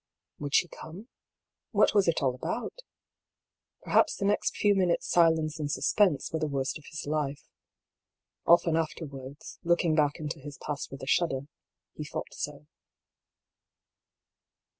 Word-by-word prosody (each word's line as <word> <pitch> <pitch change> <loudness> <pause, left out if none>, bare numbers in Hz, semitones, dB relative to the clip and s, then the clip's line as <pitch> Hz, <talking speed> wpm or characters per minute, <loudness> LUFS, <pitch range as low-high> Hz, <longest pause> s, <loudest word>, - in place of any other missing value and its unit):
Would 145 -1 -2
she 175 - +4
come? 180 +9 -10 0.6
What - - +4
was 200 -3 +4
it 165 -3 +2
all 130 -2 +2
about? 125 - -3 1.1
Perhaps - - +3
the 195 - -2
next 205 +1 +1
few 205 -1 +4
minutes' 180 -3 +1
silence 160 -2 +3
and 145 -1 -2
suspense 185 -6 +2
were 160 - 0
the 155 - 0
worst 140 +1 -2
of 145 - -19
his 155 - -6
life. 145 -1 -2 1.0
Often 170 -1 +5
afterwards, 145 -4 -5
looking 170 -1 +3
back 150 -2 +3
into 155 0 -5
his 140 0 -9
past 145 -2 -4
with 135 - -9
a - - -6
shudder, 140 -4 +2 0.5
he 150 - -6
thought 150 - -6
so. 150 0 -5
155 Hz, 140 wpm, -29 LUFS, 145-170 Hz, 1.1 s, Often